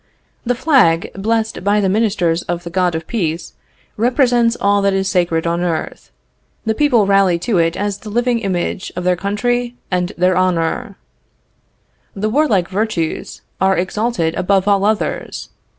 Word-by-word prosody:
The 245 - +2
flag, 175 - +3
blessed 220 +1 -1
by 205 +2 +2
the 200 - +1
ministers 190 -5 +1
of 175 0 -4
the 170 - -7
God 180 -2 +1
of 160 0 -4
Peace, 170 -7 -3 0.4
represents 240 0 +2
all 200 0 +2
that 200 -1 +2
is 190 0 0
sacred 175 -4 0
on 170 +1 0
earth; 170 -3 -3 0.6
the 220 - +1
people 245 -5 +3
rally 195 -3 +3
to 195 0 +1
it 165 0 +1
as 205 -1 -2
the 215 - -9
living 240 +2 +1
image 185 -2 -3
of 180 - -4
their 180 0 +2
country 240 +6 -1 0.2
and 180 0 0
their 180 +1 +2
honor; 180 -3 0 1.2
the 215 +2 -2
warlike 225 - +2
virtues 190 -5 -3 0.2
are 190 -1 +3
exalted 190 -2 -1
above 190 +2 +1
all 200 -1 +3
others. 215 0 -2
195 Hz, 155 wpm, -17 LUFS, 175-220 Hz, 1.2 s, flag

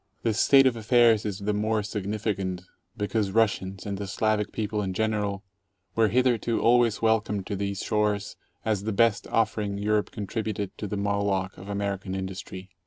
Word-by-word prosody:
This 115 -1 +1
state 135 -1 +6
of 130 -2 +3
affairs 115 -1 +4
is 100 -3 -2
the 105 +1 0
more 110 +1 0
significant 100 -3 -3 0.3
because 105 -1 0
Russians, 95 -3 0
and 100 -1 -4
the 100 - -4
Slavic 105 +1 0
people 105 -1 -2
in 95 -2 -3
general, 105 -2 -1 0.5
were 115 -1 +3
hitherto 120 -1 +2
always 120 -2 +3
welcomed 105 -3 +1
to 100 - -3
these 100 0 -3
shores 105 -1 0 0.3
as 105 -2 0
the 110 - -1
best 115 +1 +2
offering 105 -3 0
Europe 105 +1 +1
contributed 105 -1 -4
to 105 - -3
the 105 - -3
Moloch 100 -2 0
of 95 +2 -11
American 100 -1 -3
industry. 95 0 -6
105 Hz, 165 wpm, -26 LUFS, 100-110 Hz, 0.5 s, state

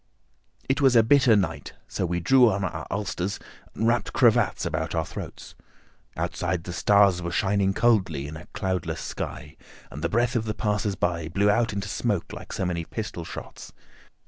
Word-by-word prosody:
It 135 +3 +1
was 135 -3 +5
a 115 - +7
bitter 130 -1 +5
night, 100 -3 -2
so 90 - -2
we 85 +1 -1
drew 125 +7 +5
on 100 -1 -1
our 95 - -4
ulsters 100 -1 -2 0.4
and 110 - 0
wrapped 115 -2 +1
cravats 120 -4 +3
about 80 +1 -2
our 80 -1 0
throats. - - -8 0.6
Outside, 90 -1 -2
the 90 - -6
stars 100 -2 +4
were 85 - -3
shining 100 +2 +1
coldly 95 -12 +2
in 75 - -8
a 80 - -10
cloudless 95 -3 -3
sky, 75 +1 -6 0.3
and 75 +3 -8
the 85 - +1
breath 120 +4 +1
of 115 -1 0
the 105 - -3
passers 105 -1 -1
by 85 -3 -1
blew 100 +5 +2
out 115 +2 +1
into 100 -2 -4
smoke 105 -8 -2
like - - -9
so 95 - -2
many 85 -2 -2
pistol 105 -2 -5
shots. - - -9
100 Hz, 180 wpm, -25 LUFS, 85-110 Hz, 0.6 s, a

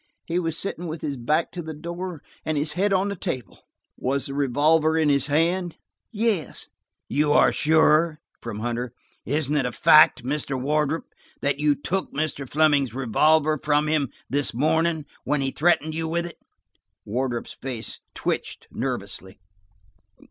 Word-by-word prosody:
He 170 +1 0
was 165 -2 -1
sitting 175 -3 -4
with 160 0 -6
his 145 -2 -2
back 150 +7 0
to 180 - -5
the 160 -1 -7
door, 170 +1 -6 0.2
and 155 -1 -1
his 150 +1 0
head 195 +5 +1
on 195 +1 +2
the 200 - -3
table." 125 - -5 0.4
"Was 135 +2 -1
the 135 - -3
revolver 150 +4 +3
in 155 -2 +3
his 140 -1 +2
hand?" 170 +4 +1 0.3
"Yes." 210 - -1 0.4
"You 145 0 +2
are - - +5
sure?" 155 +1 +3 0.2
from 110 -3 -6
Hunter. 120 +1 -3 0.3
"Isn't 150 0 0
it 135 -4 +2
a - - -3
fact, 155 +1 +6
Mr. 135 0 -2
Wardrop, 150 +3 -1 0.3
that 145 0 0
you 150 -1 +3
took 190 +7 -3
Mr. 145 -3 -3
Fleming's 145 -5 +3
revolver 155 +5 +3
from 150 0 +2
him 150 -4 +1 0.2
this 140 -3 0
morning 160 +3 +1 0.2
when 145 0 0
he 135 0 0
threatened 160 0 +2
you 160 0 -2
with 170 +1 -1
it?" 170 - -9 0.7
Wardrop's 120 +2 -2
face 125 -4 -5 0.2
twitched - - -3
nervously. 95 +3 -5
150 Hz, 155 wpm, -24 LUFS, 135-160 Hz, 0.7 s, fact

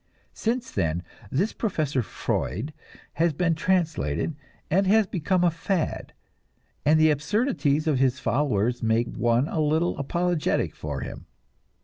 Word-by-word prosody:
Since 235 +2 -2
then 85 -2 -1 0.3
this 185 - 0
Professor 155 - -1
Freud 110 - -3 0.4
has 165 -1 +2
been 170 +2 +1
translated, 160 - 0 0.4
and 190 +3 +3
has 215 +2 +5
become 180 0 0
a 175 - +4
fad, 165 +2 -2 0.7
and 155 +2 +4
the 155 0 +6
absurdities 150 - +1
of 150 -5 +2
his 130 -1 +2
followers 120 -4 0
make 115 +1 +1
one 120 +3 +2
a 160 - -1
little 160 +3 +1
apologetic 170 +3 0
for - - -5
him. - - -7
155 Hz, 130 wpm, -26 LUFS, 130-180 Hz, 0.7 s, the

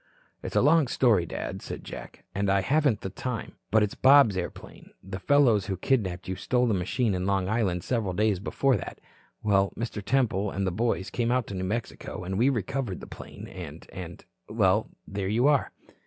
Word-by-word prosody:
"It's - - -6
a - - +4
long 155 0 +5
story, 110 -9 +3
Dad," - - -5
said - - -7
Jack, - - -9
"and 100 0 0
I 100 0 +3
haven't 135 - +2
the 95 - -5
time. 125 0 -4 0.2
But 110 0 +4
it's 105 - -1
Bob's 135 -6 +6
airplane. 90 -1 -6
The 95 0 -6
fellows 120 -5 +4
who 95 -2 -2
kidnapped 95 -9 0
you 95 - -2
stole 125 +5 +1
the 115 - +2
machine 100 +4 0
in 90 +1 -1
Long 95 -2 +1
Island 95 -5 0
several 110 -6 -1
days 105 -1 +1
before 130 +5 +1
that. - - -7 0.4
Well, 100 -2 +3
Mr. 110 -3 -4
Temple 110 -5 +1
and 100 0 -2
the 95 - 0
boys 105 0 -1
came 120 -1 0
out 125 -1 +1
to - - -5
New 95 -1 -3
Mexico, 110 -2 -4
and 95 +2 -3
we 125 +4 +5
recovered 125 -4 -2
the - - -9
plane - - -10
and, 80 -4 -9
and 90 -2 -8 0.2
well, - - +2 0.2
there 100 -1 -3
you 115 +6 +2
are." 145 -2 +3
105 Hz, 200 wpm, -27 LUFS, 95-125 Hz, 0.4 s, Bob's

